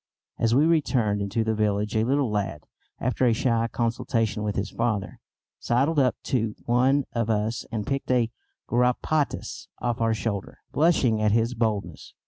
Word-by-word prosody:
As 115 0 +2
we 145 +4 +5
returned 125 -11 +2
into 100 +3 -1
the 110 0 0
village 105 0 0
a 110 - +3
little 135 0 +1
lad, 100 -7 -2 0.3
after 125 +1 -1
a 115 - +4
shy 115 0 +1
consultation 115 -2 -1
with 105 -1 -2
his 100 0 -2
father, 110 -4 -2 0.4
sidled 140 +6 +1
up 130 -2 +3
to 115 -4 -1
one 130 +4 +3
of 115 -2 -1
us 110 +1 -1
and 110 -3 -3
picked 135 -1 -3
a 120 -3 +2 0.4
garrapatas 125 +5 0
off 120 -1 -2
our 115 -1 +2
shoulder, 105 -3 -4
blushing 135 -9 +3
at 105 -1 +3
his 115 +2 +2
boldness. 105 - -3
115 Hz, 160 wpm, -25 LUFS, 105-125 Hz, 0.4 s, we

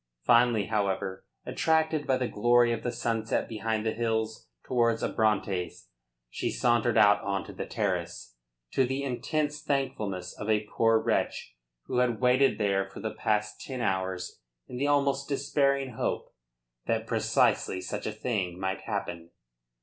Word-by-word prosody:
Finally, 120 - +4
however, 100 -3 -2 0.2
attracted 160 -2 +1
by 130 - +3
the 125 -1 -1
glory 120 +2 +3
of 115 - -2
the 120 - -2
sunset 115 -1 -1
behind 110 -1 -2
the 110 - +1
hills 110 -1 -2 0.2
towards 115 -2 +1
Abrantes, 100 -5 -1 0.4
she - - -3
sauntered 120 -1 +2
out 105 0 +6
on 100 0 -2
to - - -9
the - - -5
terrace, - - -3 0.4
to 135 - +3
the 135 +2 -1
intense 150 +3 -2
thankfulness 105 -10 -2
of 110 - -5
a 105 -1 +3
poor 115 0 +4
wretch 110 - -1 0.3
who - - -3
had 120 -3 +1
waited 130 +2 +4
there 95 -2 +1
for - - -10
the 110 - -4
past 105 0 -1
ten 130 -2 -6
hours 95 -4 -2 0.3
in 125 - -7
the 140 +3 0
almost 140 -1 +1
despairing 140 -1 +1
hope 115 - -3 0.5
that - - 0
precisely 95 - +1
such 90 - -4
a - - -1
thing 95 -7 -2
might 95 0 -2
happen. 85 -1 -4
115 Hz, 150 wpm, -28 LUFS, 105-130 Hz, 0.5 s, out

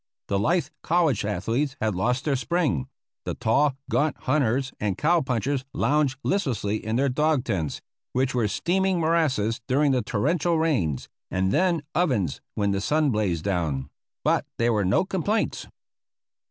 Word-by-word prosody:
The 100 - +1
lithe 170 - +2 0.2
college 160 - +2
athletes 115 +8 -1
had 110 -1 0
lost 125 +8 0
their 145 -3 +2
spring; 125 - 0 0.4
the - - -3
tall, 135 +5 +2
gaunt 150 0 +1
hunters 130 -1 +1
and 100 -3 -1
cow 170 +2 +3
punchers 130 +1 -1
lounged 145 -2 +2
listlessly 115 - -1
in 110 +1 -2
their 135 +3 +2
dog 150 +1 +1
tents, 80 - -2 0.3
which 130 +1 0
were 120 -4 +1
steaming 185 - +1
morasses 140 -9 +1
during 140 +2 +3
the 130 -2 +2
torrential 160 - +1
rains, 115 - 0 0.2
and 95 +1 0
then 175 - +2
ovens 130 - 0
when 100 -1 +1
the 100 0 -1
sun 150 +5 +2
blazed 95 -7 0
down; 80 -8 -1 0.3
but - - +1
there 115 0 +2
were 105 -3 +1
no 100 - +2
complaints. 195 +4 -1
130 Hz, 155 wpm, -25 LUFS, 105-155 Hz, 0.4 s, cow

